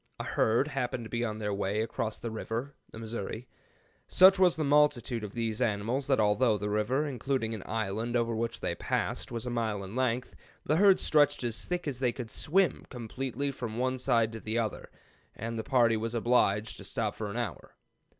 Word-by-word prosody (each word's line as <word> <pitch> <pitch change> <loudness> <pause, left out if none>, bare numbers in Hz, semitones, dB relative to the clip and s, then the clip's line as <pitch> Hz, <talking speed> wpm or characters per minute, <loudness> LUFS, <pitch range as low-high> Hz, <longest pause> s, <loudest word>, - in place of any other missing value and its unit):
A - - -2
herd 115 +6 +1
happened 125 -3 -2
to 110 - -10
be 120 0 -1
on 110 -2 -2
their 105 -1 -2
way 100 +2 -1
across 110 -1 -2
the 115 - -5
river 115 +5 -4 0.2
[the - - -11
Missouri]. 115 +1 -5 0.6
Such 190 +1 +7
was 180 -2 +5
the 155 - -1
multitude 140 -5 +2
of 105 -1 -6
these 115 -1 -2
animals 115 +4 0
that 135 -3 +3
although 105 +2 +3
the 105 +1 -3
river, 110 +8 +1
including 130 -4 -2
an 110 - -5
island 110 +2 -2
over 115 -1 +1
which 115 +1 -3
they - - -1
passed, - - -2
was 115 0 -4
a 125 - -3
mile 110 -4 -1
in 95 +4 -8
length, 125 -1 -1 0.3
the 155 - +2
herd 195 0 +6
stretched 145 -4 +3
as 115 -2 -1
thick 175 -2 -3
as 130 -4 -3
they 125 -2 +2
could 120 -2 -7
swim 185 +4 +1
completely 130 +3 -4
from 120 -4 -5
one 130 +1 0
side 115 -3 +2
to 115 - -7
the 110 +1 -3
other, 115 -2 -2 0.5
and 115 +1 -4
the - - -2
party 120 -4 +3
was 115 +2 -3
obliged 110 -3 +2
to - - -9
stop - - -2
for - - -5
an - - -5
hour. - - -5
115 Hz, 205 wpm, -30 LUFS, 110-130 Hz, 0.6 s, Such